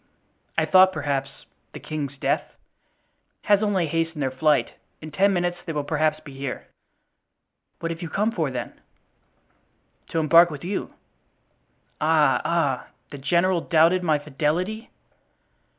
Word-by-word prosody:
"I - - +3
thought, 185 0 +6
perhaps, 140 -3 -2
that 135 - -25
the - - -8
king's 145 -3 -5
death——" - - -2 0.9
"Has 205 -1 +3
only 200 -5 +1
hastened 165 -1 -2
their 130 - -1
flight; 140 -2 +1 0.3
in 155 0 -9
ten 195 +7 +3
minutes 175 -1 -1
they 165 - -5
will 150 -1 -2
perhaps 155 +1 0
be 140 - -12
here." 135 -1 -6 1.2
"What 165 0 -2
have 165 +1 -6
you 170 - -5
come 210 +6 0
for, 165 -10 -1
then?" 125 -2 -5 1.3
"To - - -4
embark 165 +3 +6
with 150 -4 -8
you." 190 +3 -4 1.1
"Ah! 155 -1 +3
ah! 145 -7 0 0.2
the 145 - -8
general 170 +5 +1
doubted 165 +3 +3
my 160 -4 +2
fidelity?" 155 - -2
160 Hz, 140 wpm, -24 LUFS, 145-175 Hz, 1.3 s, thought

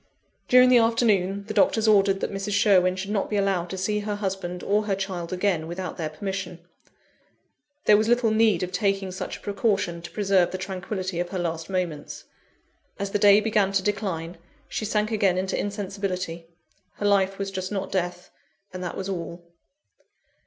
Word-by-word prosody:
During 250 0 +7
the 250 -1 +7
afternoon, 205 -4 +2
the - - -5
doctors 220 -1 +3
ordered 195 -2 +4
that - - -2
Mrs. 195 +1 -3
Sherwin 190 -3 +4
should 195 +2 -5
not 205 -2 -1
be 210 - -2
allowed 195 -3 0
to 190 - -5
see 210 +3 0
her 205 0 -3
husband 190 -3 -4
or 210 +1 +1
her 195 - +1
child 190 -3 -4
again, 180 -3 0
without 180 +2 -5
their 160 -3 -2
permission. 190 +2 -5 1.3
There 210 - +7
was 215 +1 +1
little 240 -1 +3
need 215 -5 +3
of 180 - -3
taking 195 0 0
such 185 - -5
a - - -20
precaution 200 -4 -1
to 170 - -8
preserve 195 -4 +2
the 185 - -4
tranquillity 185 -1 -4
of 175 0 -2
her 190 - -4
last 165 -1 -3
moments. 180 -6 -3 0.7
As 200 0 -3
the 205 - 0
day 205 0 +7
began 210 -3 +1
to 195 -1 +1
decline, 180 -5 -3 0.3
she 215 - -3
sank 210 +1 0
again 200 -4 +2
into 190 +1 -1
insensibility: 190 -4 -4 0.5
her 205 - -5
life 195 -1 +2
was 195 0 -3
just 185 0 -4
not 195 -2 -3
death, 180 -1 -3 0.4
and 185 0 -5
that 175 - -5
was 190 - -4
all. 170 -2 -5
195 Hz, 180 wpm, -25 LUFS, 180-205 Hz, 1.3 s, During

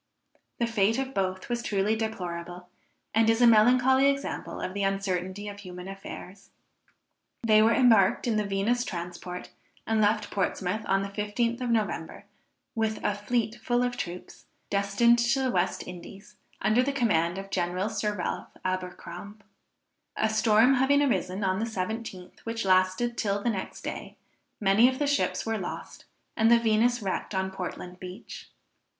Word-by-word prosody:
The 235 - +1
fate 225 -1 +2
of 270 0 -3
both 185 -1 -2
was 240 -1 -2
truly 210 -1 +1
deplorable, 180 -5 -5 0.4
and 225 +1 +4
is 225 0 +3
a 245 - +6
melancholy 250 +4 +5
example 275 0 -3
of 185 - -4
the 200 - -3
uncertainty 195 0 -2
of 205 0 -7
human 180 -2 -9
affairs. 195 0 -9 0.9
They 215 -1 +5
were 225 +1 +4
embarked 225 -7 +4
in 235 -3 +1
the 215 - +1
Venus 205 +5 0
transport, 180 -1 -6 0.3
and 220 -1 +1
left 210 0 +1
Portsmouth 195 +1 -1
the - - -11
15th 210 +5 -1
of 250 - -1
November, 215 -8 -2 0.5
with 220 -1 0
a 210 - +1
fleet 225 +2 -1
full 245 +1 +1
of 245 0 -1
troops, 180 -6 -7 0.2
destined 200 +4 +3
to 240 +3 +2
the 260 - +1
West 180 -2 0
Indies, 180 +2 -11 0.3
under 220 +3 +4
the 280 +2 0
command 175 -10 +1
of 195 0 -7
General 180 +2 -1
Sir 210 -1 -2
Ralph 180 - -3 0.2
Abercrombe. 185 +2 -5 0.7
A 220 - +2
storm 220 +3 +4
having 285 +3 +4
arisen 190 -6 0
on 190 0 +1
the 225 - 0
17th 215 -3 -5
which 230 -2 -4
lasted 185 +6 +2
till 200 -1 0
the 235 - +2
next 190 -3 -6
day, - - -6 0.4
many 210 +4 +5
of 260 - -4
the 290 - 0
ships 285 0 0
were 225 -1 -1
lost, 180 - -7 0.3
and 225 0 +4
the 235 - +7
Venus 230 +1 +2
wrecked 195 +1 -3
on 190 0 -1
Portland 180 -1 -6
Beach. 185 +1 -9
210 Hz, 160 wpm, -27 LUFS, 190-235 Hz, 0.9 s, the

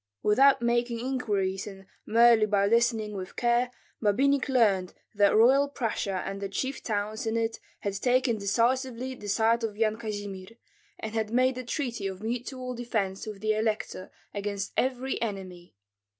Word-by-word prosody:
Without 265 +4 +5
making 235 0 +1
inquiries 205 -7 -1
and 195 -1 -10 0.2
merely 230 -1 +5
by 200 -1 +2
listening 225 -1 +2
with 185 -1 -7
care, 240 +1 +2 0.3
Babinich 270 +7 +2
learned 205 -8 +2 0.2
that 205 -1 +4
Royal 265 +6 +5
Prussia 210 -7 -2
and 195 0 -5
the 200 - -3
chief 260 +7 -3
towns 215 0 -2
in 225 +1 0
it 225 0 -1 0.2
had 200 - -2
taken 245 +2 +1
decisively 250 +5 0
the 210 -5 -8
side 225 +3 +2
of 210 -2 -3
Yan 220 -1 +1
Kazimir, 205 -1 -6 0.4
and 220 0 -6
had 220 -1 -1
made 255 +3 +2
a - - -5
treaty 240 -5 -3
of 190 +1 -7
mutual 250 +2 -4
defence 220 -5 -2
with 210 -2 -7
the 215 0 +2
elector 215 -3 -2 0.2
against 200 -1 -3
every 260 -1 -1
enemy. 185 -5 -5
225 Hz, 155 wpm, -28 LUFS, 200-245 Hz, 0.4 s, Without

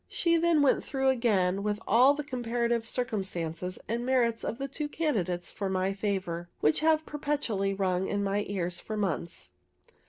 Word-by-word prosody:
She 335 -1 +1
then 335 -3 +3
went 275 - +3
through 265 -1 0
again 200 -7 +2
with 210 0 -1
all 255 +6 +6
the 295 - -3
comparative 235 -3 -1
circumstances 185 -8 -2
and 235 +2 -2
merits 240 -3 +1
of 230 - -3
the 275 +1 -3
two 295 +2 -4
candidates 195 - -1
for 200 -2 -3
my 190 +1 0
favor, 190 -4 -3
which 150 - +3
have 315 0 +3
perpetually 265 -10 -1
rung 190 -1 0
in 200 0 -1
my 200 +1 0
ears 180 -3 -2
for 215 - -5
months. 170 -4 -3
215 Hz, 165 wpm, -29 LUFS, 190-265 Hz, -, all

